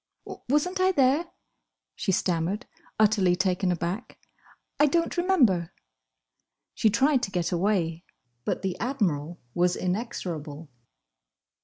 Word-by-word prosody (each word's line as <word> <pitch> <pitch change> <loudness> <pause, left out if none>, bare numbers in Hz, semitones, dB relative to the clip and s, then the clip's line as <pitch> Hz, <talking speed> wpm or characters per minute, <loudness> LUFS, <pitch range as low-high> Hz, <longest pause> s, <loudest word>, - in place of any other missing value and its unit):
"Wasn't 300 +7 +1
I 375 0 +4
there?" 285 +1 +3 0.7
she 195 - -1
stammered, 180 +4 0 0.3
utterly 205 -4 +4
taken 185 0 +1
aback. 175 +6 -4 0.6
"I 295 - +6
don't 335 +3 0
remember." 260 - +2 1.0
She 220 - +3
tried 270 +4 +3
to 225 - -2
get 180 -2 -1
away, 175 -2 0 0.4
but - - -2
the 190 -2 -1
Admiral 175 - -1
was 180 0 +2
inexorable. 170 - -4
195 Hz, 110 wpm, -27 LUFS, 175-260 Hz, 1.0 s, I